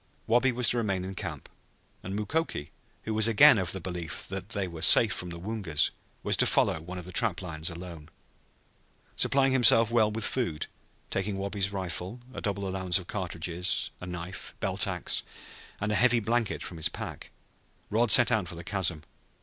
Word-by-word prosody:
Wabi 120 Hz, +3 st, +3 dB
was 125 Hz, 0 st, +2 dB
to 120 Hz, -, -1 dB
remain 95 Hz, -5 st, -1 dB
in 95 Hz, -, -6 dB
camp, 90 Hz, -7 st, -6 dB, 0.5 s
and 95 Hz, +2 st, -6 dB
Mukoki, 105 Hz, -, -2 dB, 0.3 s
who 110 Hz, -, -3 dB
was 110 Hz, 0 st, +3 dB
again 120 Hz, +2 st, +7 dB
of 90 Hz, -3 st, 0 dB
the 95 Hz, -, 0 dB
belief 85 Hz, -3 st, -5 dB
that -, -, -6 dB
they 100 Hz, -2 st, -1 dB
were 85 Hz, -2 st, -8 dB
safe 110 Hz, +5 st, +6 dB
from 90 Hz, -, -5 dB
the 85 Hz, -, -7 dB
Woongas, 95 Hz, -4 st, 0 dB, 0.3 s
was -, -, +1 dB
to -, -, +4 dB
follow 80 Hz, -, +2 dB
one 90 Hz, +3 st, -8 dB
of 90 Hz, -, -7 dB
the 90 Hz, -, -9 dB
trap 105 Hz, -1 st, +3 dB
lines 80 Hz, -2 st, -4 dB
alone. 85 Hz, -2 st, -9 dB, 1.1 s
Supplying 135 Hz, -1 st, +3 dB
himself 115 Hz, -3 st, +5 dB
well 110 Hz, -3 st, +3 dB
with 110 Hz, +1 st, 0 dB
food, 85 Hz, -13 st, -1 dB, 0.5 s
taking 95 Hz, +1 st, -2 dB
Wabi's 100 Hz, 0 st, -1 dB
rifle, 95 Hz, +3 st, -4 dB
a -, -, -6 dB
double 100 Hz, -1 st, -2 dB
allowance 95 Hz, -2 st, 0 dB
of 95 Hz, -, -6 dB
cartridges, 90 Hz, -2 st, -2 dB
a 90 Hz, -, -7 dB
knife, 90 Hz, +1 st, -7 dB
belt -, -, 0 dB
ax, -, -, -1 dB, 0.6 s
and 105 Hz, +1 st, -1 dB
a -, -, +1 dB
heavy 120 Hz, -1 st, +4 dB
blanket 115 Hz, 0 st, -1 dB
in 85 Hz, -, -9 dB
his 80 Hz, -, +1 dB
pack, -, -, -7 dB, 0.6 s
Rod 115 Hz, +2 st, +2 dB
set 120 Hz, +3 st, +7 dB
out 105 Hz, -6 st, +1 dB
for 85 Hz, -, -7 dB
the 85 Hz, -, -8 dB
chasm. 90 Hz, -5 st, 0 dB
95 Hz, 185 wpm, -28 LUFS, 90-110 Hz, 1.1 s, again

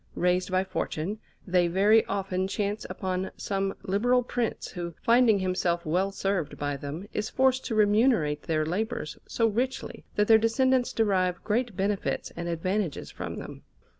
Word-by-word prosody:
Raised 180 Hz, +1 st, +1 dB
by 185 Hz, 0 st, +2 dB
fortune, 190 Hz, +1 st, -3 dB, 0.3 s
they 180 Hz, -2 st, +3 dB
very 205 Hz, +5 st, +4 dB
often 190 Hz, -1 st, -1 dB
chance 205 Hz, +2 st, -2 dB
upon 185 Hz, -1 st, -2 dB
some 195 Hz, -1 st, -2 dB
liberal 245 Hz, +6 st, +2 dB
Prince, 240 Hz, -1 st, -2 dB
who, 170 Hz, -2 st, -6 dB
finding 235 Hz, -2 st, +5 dB
himself 185 Hz, -2 st, 0 dB
well 185 Hz, +5 st, +1 dB
served 195 Hz, -6 st, -2 dB
by 145 Hz, 0 st, -2 dB
them, 145 Hz, +8 st, -6 dB
is 210 Hz, +1 st, -2 dB
forced 260 Hz, 0 st, +2 dB
to 225 Hz, -, -2 dB
remunerate 210 Hz, -, +3 dB
their 155 Hz, -1 st, 0 dB
labours 180 Hz, -2 st, -3 dB
so 230 Hz, -, +1 dB
richly 245 Hz, +4 st, -2 dB
that 210 Hz, 0 st, +2 dB
their 220 Hz, -1 st, +7 dB
descendants 255 Hz, +3 st, +2 dB
derive 185 Hz, -5 st, +1 dB
great 230 Hz, 0 st, 0 dB
benefits 200 Hz, +1 st, -1 dB
and 170 Hz, 0 st, -4 dB
advantages 180 Hz, +1 st, -2 dB
from -, -, -6 dB
them. -, -, -8 dB
195 Hz, 155 wpm, -27 LUFS, 180-220 Hz, 0.3 s, their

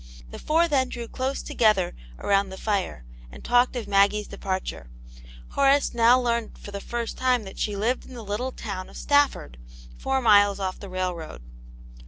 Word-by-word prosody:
The -, -, -8 dB
four 330 Hz, +2 st, +2 dB
then 265 Hz, -5 st, +1 dB
drew 240 Hz, -2 st, -6 dB
close 260 Hz, +4 st, -3 dB
together 210 Hz, -6 st, +2 dB, 0.2 s
around 200 Hz, -1 st, +1 dB
the 190 Hz, -, -8 dB
fire, 195 Hz, -, -2 dB, 0.3 s
and -, -, -12 dB
talked 245 Hz, +1 st, +3 dB
of 240 Hz, -4 st, -4 dB
Maggie's 205 Hz, +1 st, +3 dB
departure; 185 Hz, -, -4 dB, 0.6 s
Horace 280 Hz, 0 st, +3 dB
now 240 Hz, +2 st, +5 dB
learned 235 Hz, -2 st, -1 dB
for 205 Hz, -, -10 dB
the 200 Hz, 0 st, -6 dB
first 235 Hz, +1 st, -4 dB
time 255 Hz, -3 st, +2 dB
that 195 Hz, -, -10 dB
she 210 Hz, -, -1 dB
lived 230 Hz, +6 st, -1 dB
in 255 Hz, -, -11 dB
the 230 Hz, -3 st, -8 dB
little 215 Hz, +6 st, -2 dB
town 195 Hz, -6 st, -6 dB
of -, -, -12 dB
Stafford, 285 Hz, -, +1 dB, 0.4 s
four 270 Hz, 0 st, 0 dB
miles 205 Hz, -4 st, +5 dB
off 190 Hz, -1 st, -3 dB
the 200 Hz, -, -9 dB
railroad. 180 Hz, -, -4 dB
215 Hz, 175 wpm, -25 LUFS, 195-250 Hz, 0.6 s, now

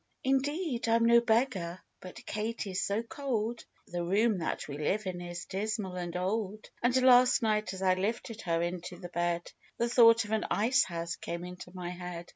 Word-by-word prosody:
" -, -, -45 dB
4 265 Hz, -, +1 dB
Indeed, 275 Hz, -2 st, -1 dB
I'm 230 Hz, 0 st, +4 dB
no 235 Hz, 0 st, +6 dB
beggar, 220 Hz, -7 st, 0 dB, 0.2 s
but 185 Hz, -, -10 dB
Katy's 215 Hz, -3 st, -3 dB
so 205 Hz, +3 st, 0 dB
cold! 235 Hz, -5 st, -3 dB, 0.2 s
The 175 Hz, 0 st, -4 dB
room 205 Hz, +3 st, +2 dB
that 165 Hz, -, -3 dB
we 145 Hz, 0 st, -6 dB
live 200 Hz, +8 st, 0 dB
in 180 Hz, -1 st, -4 dB
is 175 Hz, 0 st, -6 dB
dismal 205 Hz, -1 st, -3 dB
and 175 Hz, -1 st, -4 dB
old; 210 Hz, +3 st, -3 dB
And, 250 Hz, +1 st, +3 dB
last 250 Hz, -1 st, +6 dB
night, 215 Hz, -3 st, +1 dB
as 190 Hz, -, -5 dB
I 185 Hz, -1 st, +4 dB
lifted 220 Hz, +4 st, -3 dB
her 170 Hz, -1 st, 0 dB
into 175 Hz, +1 st, -4 dB
the 175 Hz, -1 st, -8 dB
bed, 175 Hz, 0 st, -1 dB, 0.3 s
The 235 Hz, -, +1 dB
thought 230 Hz, -2 st, +6 dB
of 210 Hz, -, -8 dB
an 220 Hz, -1 st, +1 dB
ice 240 Hz, +5 st, +3 dB
house 170 Hz, -1 st, -4 dB
came 170 Hz, +1 st, -5 dB
into 180 Hz, 0 st, -9 dB
my 180 Hz, -1 st, -5 dB
head. 175 Hz, -1 st, -7 dB
200 Hz, 195 wpm, -30 LUFS, 175-230 Hz, 0.3 s, no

